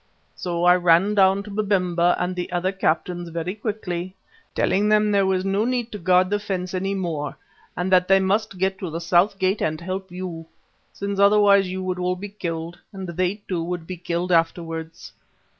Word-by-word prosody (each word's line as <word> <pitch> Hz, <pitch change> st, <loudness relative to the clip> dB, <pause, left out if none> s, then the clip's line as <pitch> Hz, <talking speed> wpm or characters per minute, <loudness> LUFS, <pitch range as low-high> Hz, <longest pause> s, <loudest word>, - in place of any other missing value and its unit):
So 175 Hz, -1 st, -3 dB
I 180 Hz, 0 st, +6 dB
ran 175 Hz, +3 st, +4 dB
down 195 Hz, -1 st, +4 dB
to 205 Hz, -, -10 dB
Babemba 180 Hz, -4 st, +1 dB
and 180 Hz, +1 st, -2 dB
the 180 Hz, +1 st, -4 dB
other 180 Hz, +1 st, 0 dB
captains 175 Hz, -2 st, -1 dB
very 170 Hz, +2 st, -3 dB
quickly, 195 Hz, -4 st, -4 dB, 0.4 s
telling 205 Hz, +2 st, +2 dB
them 210 Hz, 0 st, +3 dB
there 200 Hz, -1 st, +3 dB
was 190 Hz, 0 st, 0 dB
no 195 Hz, +2 st, +1 dB
need 245 Hz, -1 st, -1 dB
to 210 Hz, -, -6 dB
guard 185 Hz, +1 st, +3 dB
the 205 Hz, -, +1 dB
fence 185 Hz, -3 st, -4 dB
any 195 Hz, +2 st, -1 dB
more, 160 Hz, -6 st, -3 dB, 0.4 s
and 180 Hz, +2 st, -1 dB
that 180 Hz, -1 st, +4 dB
they 195 Hz, 0 st, +5 dB
must 195 Hz, +1 st, 0 dB
get 190 Hz, +1 st, 0 dB
to 185 Hz, -, -4 dB
the 165 Hz, +1 st, -4 dB
south 175 Hz, +4 st, +2 dB
gate 190 Hz, +2 st, 0 dB
and 155 Hz, 0 st, -1 dB
help 190 Hz, +2 st, -5 dB
you, 175 Hz, -3 st, -6 dB, 0.4 s
since 200 Hz, 0 st, -4 dB
otherwise 200 Hz, -1 st, +5 dB
you 185 Hz, +1 st, -4 dB
would 185 Hz, -1 st, -3 dB
all 180 Hz, 0 st, 0 dB
be 200 Hz, +3 st, -7 dB
killed, 170 Hz, -4 st, -5 dB
and 190 Hz, -2 st, -7 dB
they, 185 Hz, +4 st, -2 dB
too, 175 Hz, -3 st, -2 dB
would 175 Hz, -1 st, -4 dB
be 185 Hz, -, -6 dB
killed 175 Hz, +1 st, -3 dB
afterwards. 165 Hz, -1 st, -1 dB
185 Hz, 190 wpm, -23 LUFS, 175-195 Hz, 0.4 s, I